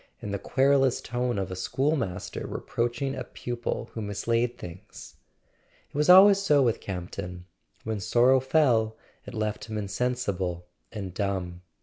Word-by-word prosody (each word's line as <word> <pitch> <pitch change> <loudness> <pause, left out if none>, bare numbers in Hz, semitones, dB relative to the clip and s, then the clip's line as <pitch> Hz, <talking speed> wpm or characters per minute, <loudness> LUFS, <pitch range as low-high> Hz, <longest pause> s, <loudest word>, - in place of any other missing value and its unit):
in 105 - -6
the 100 - -2
querulous 135 +1 +3
tone 125 -2 -2
of 95 -1 -3
a - - -3
schoolmaster 130 - -2
re¬ - - -6
proaching 120 +3 -1
a 125 - -4
pupil 120 0 -5
who 110 - -5
mislaid 115 +4 -1
things? 90 +1 -11 0.7
It - - -19
was 150 +3 +1
always 195 +2 +9
so 150 -8 +4
with 115 -2 +1
Campton: 90 -1 -6 0.4
when 110 -1 -3
sorrow 125 +6 +4
fell 125 -6 +2 0.3
it - - -8
left 110 -1 -2
him 110 -1 -5
insensible 100 -5 -2 0.3
and 100 -5 -6
dumb. 95 -3 -3
115 Hz, 145 wpm, -27 LUFS, 95-130 Hz, 0.7 s, always